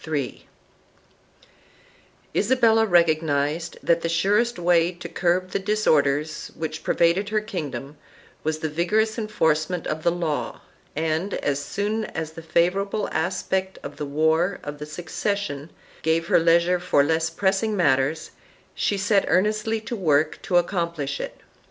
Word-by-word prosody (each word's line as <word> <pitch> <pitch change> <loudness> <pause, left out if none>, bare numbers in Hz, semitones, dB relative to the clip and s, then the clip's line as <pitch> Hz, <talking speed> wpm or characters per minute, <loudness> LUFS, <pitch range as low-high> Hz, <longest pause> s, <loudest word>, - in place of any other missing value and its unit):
3 145 -6 -4 1.9
Isabella 225 -1 +3
recognized 160 -2 +1
that 170 0 +2
the 165 - -1
surest 205 +8 +2
way 175 -1 +3
to 175 0 -8
curb 180 +2 0
the - - 0
disorders 155 -7 +1
which 160 0 -5
pervaded 175 +4 +2
her 215 0 +1
kingdom 155 -8 -5 0.5
was 155 0 -1
the 160 - -3
vigorous 215 +9 0
enforcement 170 -5 0
of 155 +1 -3
the 170 - +3
law 170 -4 -2 0.4
and, 160 +5 -1
as 145 0 -1
soon 210 +5 -2
as 160 -5 -5
the 165 - -10
favorable 185 +6 0
aspect 185 +3 -1
of 145 0 -8
the 150 - -4
war 160 +6 +1
of 145 0 -7
the 150 - -6
succession 170 -1 -3 0.3
gave 165 +1 0
leisure 170 +2 +4
for 175 -5 +3
less 160 +2 +1
pressing 195 +5 0
matters, 145 -1 +1 0.4
she 205 - 0
set 200 0 +2
earnestly 215 +5 +1
to 230 +2 -5
work 155 -6 +1
to 180 - +1
accomplish 170 -6 -1
it. - - -7
170 Hz, 135 wpm, -24 LUFS, 155-195 Hz, 1.9 s, leisure